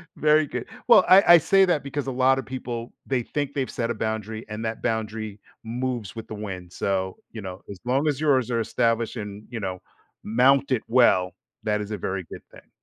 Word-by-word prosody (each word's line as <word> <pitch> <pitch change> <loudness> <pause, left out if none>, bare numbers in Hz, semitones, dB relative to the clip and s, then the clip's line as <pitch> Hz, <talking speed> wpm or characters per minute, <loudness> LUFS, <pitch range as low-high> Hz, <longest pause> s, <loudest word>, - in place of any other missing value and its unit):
very 155 0 +3
good. 125 -3 -5 0.2
Well, 215 -6 +8
I 190 +2 +8
I - - +9
say 195 +4 +4
that 175 -5 +1
because 140 0 -4
a - - -1
lotta 130 +1 +2
people, 120 -2 -6
they 130 -3 0
think 145 +1 -3
they've 135 -3 -2
set 115 -1 -3
a - - 0
boundary 110 0 -4
and 105 +1 -5
that 110 0 -4
boundary 110 -2 -3 0.2
moves 120 -3 -4
with 115 - -7
the 110 - -6
wind. 95 -4 -7
So, 95 0 -2
you 110 - -7
know, 95 -1 -7
as 100 -2 -8
long 135 +5 +1
as 145 -2 0
yours 130 -5 +2
are 115 - +1
established 115 +1 0
and, 105 -1 -7
you 120 -2 -5
know, 95 -2 -4 0.4
mounted 130 +2 +3
well, 115 -7 +4 0.3
that 105 -1 0
is 105 - -6
a 105 - -2
very 95 0 -3
good - - -9
thing. - - -17
115 Hz, 205 wpm, -25 LUFS, 105-130 Hz, 0.4 s, I